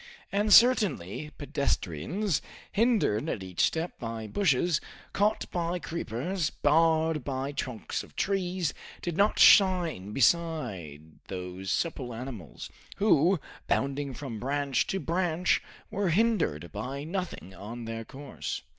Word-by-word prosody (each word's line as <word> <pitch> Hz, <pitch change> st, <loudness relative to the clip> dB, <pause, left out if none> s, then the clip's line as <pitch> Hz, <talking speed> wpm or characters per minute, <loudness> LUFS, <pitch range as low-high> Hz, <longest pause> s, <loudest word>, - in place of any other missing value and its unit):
And 205 Hz, +2 st, +1 dB
certainly, 200 Hz, -, +5 dB
pedestrians, 140 Hz, -, -1 dB, 0.3 s
hindered 205 Hz, -, +2 dB
at 95 Hz, -, -3 dB
each 90 Hz, -2 st, -9 dB
step 165 Hz, +2 st, 0 dB
by 115 Hz, -2 st, -5 dB
bushes, 155 Hz, -, +2 dB, 0.3 s
caught 205 Hz, +2 st, +1 dB
by 175 Hz, 0 st, -1 dB
creepers, 165 Hz, -, -2 dB
barred 160 Hz, 0 st, +2 dB
by 135 Hz, +1 st, -3 dB
trunks 125 Hz, -5 st, -4 dB
of -, -, -14 dB
trees, 185 Hz, -5 st, 0 dB, 0.3 s
did 175 Hz, -2 st, -2 dB
not 205 Hz, +4 st, +3 dB
shine 175 Hz, -, +5 dB
beside 105 Hz, -, 0 dB
those 90 Hz, 0 st, -5 dB
supple 130 Hz, -8 st, -2 dB
animals, 115 Hz, -, -7 dB, 0.2 s
who, 185 Hz, -3 st, +4 dB, 0.3 s
bounding 140 Hz, 0 st, -1 dB
from 130 Hz, -5 st, -6 dB
branch 140 Hz, +1 st, 0 dB
to 195 Hz, -, -1 dB
branch, 175 Hz, 0 st, +1 dB, 0.3 s
were 200 Hz, -2 st, 0 dB
hindered 170 Hz, -, +1 dB
by 130 Hz, +7 st, -5 dB
nothing 170 Hz, -, -5 dB
on 115 Hz, +5 st, -7 dB
their 115 Hz, 0 st, -4 dB
course. 135 Hz, +3 st, -6 dB
145 Hz, 120 wpm, -29 LUFS, 115-180 Hz, 0.3 s, certainly